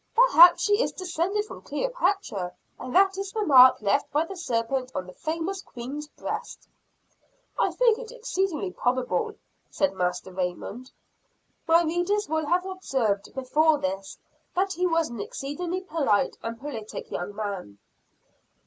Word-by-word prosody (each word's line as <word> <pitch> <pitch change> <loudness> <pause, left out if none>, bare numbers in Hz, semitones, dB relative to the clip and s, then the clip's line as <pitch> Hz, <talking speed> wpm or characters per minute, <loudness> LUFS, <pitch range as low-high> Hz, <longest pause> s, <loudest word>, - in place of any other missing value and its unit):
"Perhaps 350 -8 +7
she 415 +2 +3
is - - 0
descended 370 +3 -2
from - - -10
Cleopatra 395 - -2 0.2
and 255 0 -6
that 385 0 +4
is 390 -1 -4
the 430 -2 -1
mark 255 -4 +8
left 205 +8 +1
by 300 +3 +1
the 390 - -8
serpent 255 -4 -2
on 185 - -2
the 185 - -11
famous 330 - -3
queen's 275 +1 -7
breast." - - -6 0.9
"I - - +3
think 475 -2 +3
it 475 -2 -8
exceedingly 390 -7 -2
probable," 260 - -1 0.3
said 290 - 0
Master 180 0 -2
Raymond. 185 +7 -4 0.8
My 335 +1 +5
readers 350 +6 0
will 315 0 -1
have 360 +3 +2
observed 265 - -1
before 300 +4 +3
this, 195 -3 -4 0.4
that 385 +1 +1
he 360 0 +1
was 330 -4 +1
an 235 -3 -6
exceedingly 340 - -4
polite 300 - +1
and 230 0 -5
politic 235 -7 -7
young 190 +3 -4
man. 200 - -5
310 Hz, 145 wpm, -26 LUFS, 235-375 Hz, 0.9 s, mark